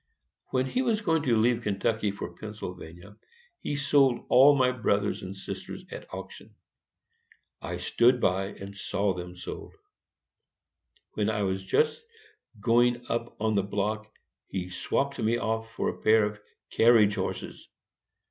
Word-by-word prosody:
When 130 Hz, 0 st, 0 dB
he 245 Hz, -, -1 dB
was 230 Hz, -4 st, +1 dB
going 165 Hz, -6 st, +2 dB
to 120 Hz, -5 st, +2 dB
leave 120 Hz, +2 st, +3 dB
Kentucky 105 Hz, 0 st, 0 dB
for 100 Hz, -3 st, -6 dB
Pennsylvania, 90 Hz, -2 st, -9 dB, 0.4 s
he 145 Hz, -, -3 dB
sold 140 Hz, -3 st, +3 dB
all 140 Hz, +3 st, +7 dB
my 130 Hz, -2 st, +3 dB
brothers 105 Hz, -5 st, 0 dB
and 95 Hz, +1 st, -7 dB
sisters 95 Hz, -, -7 dB
at -, -, -9 dB
auction. -, -, -9 dB, 1.1 s
I -, -, -4 dB
stood 125 Hz, +1 st, +3 dB
by 95 Hz, -2 st, +1 dB
and 100 Hz, 0 st, -9 dB
saw 100 Hz, 0 st, -1 dB
them 90 Hz, 0 st, -7 dB
sold. 90 Hz, -, -8 dB, 1.4 s
When 105 Hz, 0 st, 0 dB
I 105 Hz, -2 st, 0 dB
was 95 Hz, 0 st, -1 dB
just 460 Hz, -, +1 dB, 0.6 s
going 120 Hz, +3 st, +3 dB
up 115 Hz, +1 st, -3 dB
on 110 Hz, 0 st, +1 dB
to 100 Hz, -, +3 dB
the 100 Hz, -, -7 dB
block, 110 Hz, +2 st, -2 dB, 0.4 s
he 90 Hz, -1 st, -4 dB
swapped 140 Hz, +8 st, -1 dB
me 115 Hz, +1 st, +1 dB
off 115 Hz, -1 st, -2 dB
for -, -, 0 dB
a -, -, -7 dB
pair 110 Hz, 0 st, +5 dB
of 105 Hz, 0 st, -5 dB, 0.3 s
carriage 110 Hz, -3 st, +5 dB
horses. 95 Hz, -2 st, -5 dB
110 Hz, 145 wpm, -28 LUFS, 100-125 Hz, 1.4 s, all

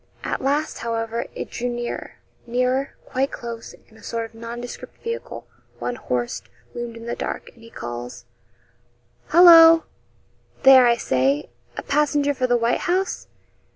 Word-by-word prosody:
At -, -, -3 dB
last, 285 Hz, +3 st, -1 dB
however, 230 Hz, 0 st, -3 dB
it -, -, -6 dB
drew 245 Hz, +1 st, -3 dB
nearer 240 Hz, 0 st, -5 dB, 0.3 s
nearer 255 Hz, +3 st, 0 dB
quite 270 Hz, +2 st, -1 dB
close 235 Hz, -3 st, -7 dB
and 220 Hz, 0 st, -20 dB
a -, -, -19 dB
sort 230 Hz, -1 st, -3 dB
of 225 Hz, -, -14 dB
nondescript 235 Hz, +2 st, -8 dB
vehicle 465 Hz, 0 st, -5 dB, 0.3 s
one -, -, -3 dB
horsed 125 Hz, -, -3 dB, 0.2 s
loomed 240 Hz, -1 st, -6 dB
in 230 Hz, -, -10 dB
the 235 Hz, -, -3 dB
dark, -, -, -5 dB
and 235 Hz, -, -21 dB
he 230 Hz, -, -14 dB
calls 120 Hz, -, -7 dB, 1.0 s
'Hallo! 330 Hz, -2 st, +8 dB, 0.8 s
there 265 Hz, -2 st, +8 dB
I 235 Hz, -, +4 dB
say 135 Hz, -, 0 dB, 0.3 s
a -, -, -4 dB
passenger 290 Hz, 0 st, +1 dB
for 255 Hz, -2 st, -1 dB
the 245 Hz, -1 st, +3 dB
"White 235 Hz, +1 st, +1 dB
House?"' 375 Hz, +2 st, -1 dB
240 Hz, 150 wpm, -22 LUFS, 230-275 Hz, 1.0 s, Hallo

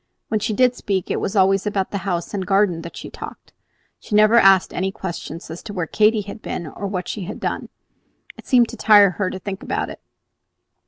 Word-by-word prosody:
When 215 Hz, -, +1 dB
she 220 Hz, +2 st, -2 dB
did 250 Hz, +2 st, +3 dB
speak 190 Hz, -3 st, -2 dB
it -, -, 0 dB
was 195 Hz, -, -3 dB
always 195 Hz, +1 st, +3 dB
about 195 Hz, -2 st, -1 dB
the 200 Hz, -, -2 dB
house 175 Hz, +1 st, -2 dB
and 200 Hz, -, -2 dB
the 185 Hz, -, -6 dB
garden 195 Hz, -4 st, +2 dB
that 170 Hz, 0 st, -9 dB
she -, -, -8 dB
talked. -, -, -10 dB, 0.5 s
She 210 Hz, -, -4 dB
never 215 Hz, +1 st, +5 dB
asked 195 Hz, -5 st, +5 dB
any 190 Hz, +1 st, -1 dB
questions 170 Hz, -4 st, -7 dB
as 165 Hz, -, -7 dB
to 210 Hz, -, -8 dB
where 180 Hz, -4 st, -2 dB
Katy 215 Hz, +5 st, +3 dB
had 205 Hz, +2 st, -9 dB
been, 170 Hz, -, -5 dB
or 200 Hz, +6 st, -6 dB
what 185 Hz, -2 st, -4 dB
she 200 Hz, -4 st, -4 dB
had -, -, -7 dB
done; -, -, -3 dB, 0.7 s
it -, -, -15 dB
seemed 245 Hz, -3 st, +4 dB
to -, -, -7 dB
tire 205 Hz, -3 st, +6 dB
her 185 Hz, 0 st, -2 dB
to -, -, -5 dB
think 195 Hz, +1 st, -6 dB
about -, -, -3 dB
it. -, -, -11 dB
195 Hz, 225 wpm, -21 LUFS, 185-210 Hz, 0.7 s, tire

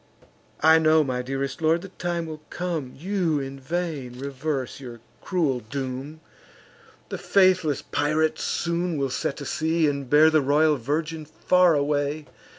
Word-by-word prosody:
I 160 Hz, +1 st, +6 dB
know, 155 Hz, 0 st, +4 dB
my 130 Hz, -3 st, -2 dB
dearest 135 Hz, +2 st, -4 dB
lord, 165 Hz, +2 st, +2 dB
the 195 Hz, -, -8 dB
time 175 Hz, -2 st, -3 dB
will 155 Hz, -1 st, -8 dB
come, 165 Hz, -7 st, -3 dB
You'd 170 Hz, -3 st, 0 dB
in 135 Hz, 0 st, -7 dB
vain, 145 Hz, -4 st, -4 dB
reverse 140 Hz, 0 st, -4 dB
your 120 Hz, -3 st, -9 dB, 0.2 s
cruel 155 Hz, -9 st, 0 dB
doom; 135 Hz, +6 st, -6 dB, 0.9 s
The -, -, -5 dB
faithless 185 Hz, -6 st, +3 dB
pirate 155 Hz, +2 st, 0 dB
soon 170 Hz, -1 st, -1 dB
will 135 Hz, -2 st, -1 dB
set 135 Hz, -, -2 dB
to 140 Hz, -, -7 dB
sea, 160 Hz, +3 st, +1 dB
And 140 Hz, -3 st, -3 dB
bear 155 Hz, +3 st, +6 dB
the 155 Hz, -1 st, +4 dB
royal 150 Hz, +2 st, +3 dB
virgin 155 Hz, +5 st, -3 dB
far 175 Hz, +2 st, +3 dB
away! 145 Hz, +1 st, -1 dB
155 Hz, 150 wpm, -25 LUFS, 135-165 Hz, 0.9 s, I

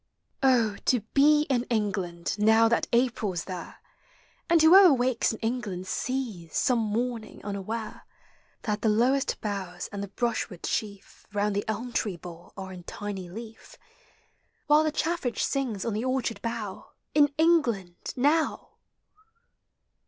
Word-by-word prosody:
Oh 235 Hz, -6 st, +3 dB
to 250 Hz, -3 st, +3 dB
be 295 Hz, +2 st, +5 dB
in 255 Hz, -4 st, 0 dB
England 195 Hz, -6 st, -2 dB
now 220 Hz, +2 st, +5 dB
thai 230 Hz, -, +2 dB
April's 235 Hz, -7 st, +1 dB
there 180 Hz, -3 st, -7 dB, 0.7 s
And 335 Hz, 0 st, +5 dB
whoever 355 Hz, +3 st, +8 dB
wakes 250 Hz, -2 st, +2 dB
in 225 Hz, -, -5 dB
England 220 Hz, -6 st, -3 dB
sees, 220 Hz, -7 st, -3 dB
some 250 Hz, -2 st, +2 dB
morn 225 Hz, +2 st, -1 dB
ing, 215 Hz, -, -14 dB
unaware, 210 Hz, +2 st, -5 dB, 0.6 s
That 210 Hz, -2 st, -2 dB
the 220 Hz, -, +2 dB
lowest 250 Hz, +6 st, +2 dB
boughs 190 Hz, -4 st, -4 dB
and 200 Hz, -1 st, -5 dB
the 200 Hz, -, -4 dB
brushwood 210 Hz, -4 st, -3 dB
Bheal 200 Hz, -2 st, -2 dB, 0.3 s
Round 205 Hz, 0 st, 0 dB
the 205 Hz, -, -1 dB
elm 230 Hz, +3 st, -3 dB
tree 195 Hz, -5 st, -1 dB
bole 170 Hz, 0 st, -11 dB
are 190 Hz, -1 st, -6 dB
in 180 Hz, -, -9 dB
tiny 200 Hz, -3 st, -6 dB
leaf, 225 Hz, +4 st, -10 dB, 0.9 s
While 300 Hz, +1 st, +5 dB
the 310 Hz, -, +1 dB
chaffinch 315 Hz, -6 st, -1 dB
sings 250 Hz, -8 st, -2 dB
on 230 Hz, -, -1 dB
the 215 Hz, +3 st, -2 dB
orchard 255 Hz, -5 st, -1 dB
bongo 215 Hz, -4 st, -5 dB, 0.2 s
In 290 Hz, -1 st, +5 dB
England— 240 Hz, -, +1 dB
now 295 Hz, +5 st, +1 dB
225 Hz, 140 wpm, -27 LUFS, 200-255 Hz, 0.9 s, whoever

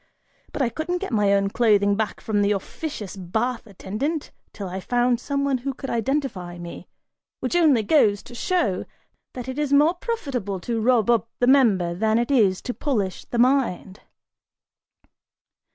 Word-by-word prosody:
But 285 Hz, -, -1 dB
I 240 Hz, -, +1 dB
couldn't 315 Hz, +8 st, -2 dB
get 390 Hz, -3 st, -5 dB
my 205 Hz, -2 st, +3 dB
own 200 Hz, 0 st, +2 dB
clothing 205 Hz, -3 st, +3 dB
back 215 Hz, 0 st, -3 dB
from 210 Hz, -2 st, 0 dB
the 205 Hz, +1 st, +3 dB
officious 205 Hz, -, -5 dB
bath 220 Hz, +7 st, -2 dB
attendant 215 Hz, -, -4 dB, 0.2 s
till 200 Hz, -2 st, -6 dB
I 185 Hz, +1 st, -5 dB
found 245 Hz, +3 st, +1 dB
some 280 Hz, +2 st, -2 dB
one 270 Hz, -2 st, +1 dB
who 270 Hz, +1 st, -4 dB
could 270 Hz, -, -6 dB
identify 230 Hz, -8 st, -2 dB
me, 170 Hz, 0 st, -9 dB, 0.5 s
which -, -, -2 dB
only 300 Hz, -10 st, +4 dB
goes 205 Hz, -5 st, +3 dB
to 245 Hz, -, -13 dB
show 240 Hz, -, 0 dB, 0.5 s
that 250 Hz, -1 st, -6 dB
it 260 Hz, +2 st, -4 dB
is 295 Hz, -2 st, -1 dB
more 295 Hz, +4 st, +5 dB
profitable 275 Hz, -, -3 dB
to 230 Hz, +3 st, -2 dB
rub 240 Hz, -1 st, +3 dB
up 230 Hz, -1 st, +1 dB
the 245 Hz, -, +2 dB
member 220 Hz, -10 st, +4 dB
than 220 Hz, +5 st, +1 dB
it 240 Hz, +4 st, 0 dB
is 205 Hz, -8 st, +3 dB
to 250 Hz, -, -3 dB
polish 210 Hz, -12 st, -2 dB
the 240 Hz, -, -4 dB
mind!" 240 Hz, -7 st, +1 dB
235 Hz, 170 wpm, -23 LUFS, 200-275 Hz, 0.5 s, more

